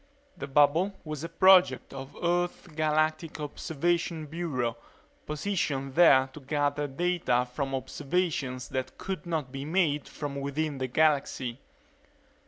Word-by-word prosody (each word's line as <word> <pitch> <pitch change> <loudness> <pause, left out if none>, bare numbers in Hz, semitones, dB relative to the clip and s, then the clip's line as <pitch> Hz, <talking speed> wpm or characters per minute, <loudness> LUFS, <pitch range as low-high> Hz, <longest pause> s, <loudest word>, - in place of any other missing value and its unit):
The 140 - -6
bubble 150 +8 +3
was 155 -1 -5
a 165 - -4
project 175 -8 +5
of 135 +1 -8
Earth's 175 +1 0
Galactic 155 -1 0
Observation 160 +2 -1
Bureau, 145 -7 -2 0.5
positioned 150 -5 -2
there 135 -5 +6
to 150 - -9
gather 145 +1 -1
data 135 -5 0
from 135 0 -2
observations 140 -2 -2
that 130 -1 -4
could 190 -2 -5
not 155 -6 -2
be 135 0 -5
made 155 -2 +1
from 145 -2 -5
within 140 +1 -2
the 130 - -1
galaxy. 135 -3 +1
150 Hz, 125 wpm, -28 LUFS, 135-170 Hz, 0.5 s, there